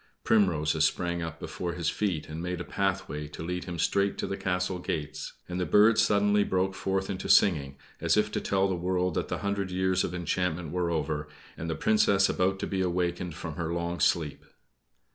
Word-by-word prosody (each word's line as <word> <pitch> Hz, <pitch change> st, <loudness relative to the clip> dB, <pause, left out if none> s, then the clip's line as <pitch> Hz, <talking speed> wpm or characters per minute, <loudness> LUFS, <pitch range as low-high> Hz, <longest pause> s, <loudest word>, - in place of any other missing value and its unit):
Primroses 80 Hz, -8 st, +2 dB
sprang 85 Hz, +2 st, 0 dB
up 80 Hz, -2 st, -5 dB
before 85 Hz, -1 st, -4 dB
his 85 Hz, -3 st, -1 dB
feet 95 Hz, -8 st, -1 dB
and 80 Hz, +1 st, -6 dB
made 90 Hz, 0 st, -3 dB
a -, -, -3 dB
pathway 95 Hz, -6 st, -2 dB
to 75 Hz, -, -8 dB
lead 90 Hz, +2 st, -3 dB
him 90 Hz, -2 st, -5 dB
straight 100 Hz, +4 st, +1 dB
to -, -, -2 dB
the 100 Hz, -, -3 dB
castle 90 Hz, -1 st, -1 dB
gates; 80 Hz, -4 st, -4 dB
and 90 Hz, 0 st, -4 dB
the 90 Hz, -, 0 dB
birds 105 Hz, +2 st, +6 dB
suddenly 105 Hz, 0 st, +3 dB
broke 95 Hz, 0 st, 0 dB
forth 95 Hz, 0 st, -1 dB
into 95 Hz, -1 st, -4 dB
singing, 70 Hz, -8 st, +4 dB, 0.2 s
as -, -, +2 dB
if 105 Hz, 0 st, +2 dB
to -, -, -2 dB
tell 95 Hz, 0 st, +1 dB
the 95 Hz, -, -1 dB
world 90 Hz, 0 st, 0 dB
that -, -, -1 dB
the -, -, -2 dB
hundred 100 Hz, -1 st, -1 dB
years 95 Hz, 0 st, +1 dB
of 90 Hz, -, -3 dB
enchantment 90 Hz, -2 st, -1 dB
were 90 Hz, -1 st, 0 dB
over, 75 Hz, -2 st, -2 dB, 0.3 s
and 80 Hz, -, -5 dB
the 80 Hz, -, -1 dB
Princess 100 Hz, +1 st, +3 dB
about 95 Hz, +1 st, +1 dB
to -, -, -3 dB
be 95 Hz, -1 st, -1 dB
awakened 90 Hz, -1 st, -1 dB
from 80 Hz, -3 st, -6 dB
her 85 Hz, -1 st, -2 dB
long 85 Hz, 0 st, -2 dB
sleep. 80 Hz, -4 st, +1 dB
90 Hz, 200 wpm, -28 LUFS, 85-95 Hz, 0.3 s, birds